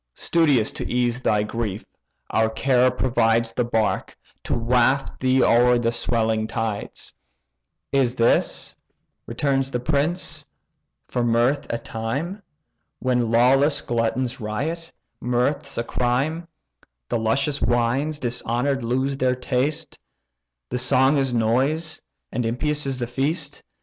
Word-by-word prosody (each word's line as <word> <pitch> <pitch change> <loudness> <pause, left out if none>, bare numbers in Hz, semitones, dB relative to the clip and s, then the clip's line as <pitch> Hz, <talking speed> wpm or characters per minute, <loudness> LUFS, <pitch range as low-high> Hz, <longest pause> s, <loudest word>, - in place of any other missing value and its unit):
Studious 145 -10 +2
to - - -5
ease 125 0 +1
thy 105 -4 +2
grief, 105 -2 -4 0.5
our 110 0 +2
care 125 +2 +3
provides 115 -2 +1
The 125 - 0
bark, 115 -2 -1 0.3
to - - 0
waft 125 +3 +1
thee 130 0 +3
o'er 125 +1 +5
the 115 -1 0
swelling 110 -2 0
tides." 110 -3 -4 0.8
"Is 130 -3 +2
this 115 -2 +1 0.5
(returns 135 +3 0
the 125 - -2
prince) 150 +7 -1 0.6
for 125 - -1
mirth 120 +5 +1
a 115 - -1
time? 140 - -4 0.6
When 125 -3 0
lawless 135 +5 +4
gluttons 120 +2 -1
riot, 155 +11 -4 0.3
mirth's 125 +4 -1
a 115 - 0
crime; 135 +8 -1 0.6
The - - 0
luscious 140 +6 0
wines, 120 +6 +1
dishonour'd, 125 +1 -1
lose 130 +4 -1
their 125 -1 +1
taste; 130 +3 -2 0.7
The 125 - -2
song 130 +3 +4
is 135 -2 +1
noise, 135 +8 0 0.3
and 125 - -1
impious 145 +6 -1
is 135 -1 -1
the 120 - -2
feast. 140 +4 -3
125 Hz, 125 wpm, -23 LUFS, 115-140 Hz, 0.8 s, o'er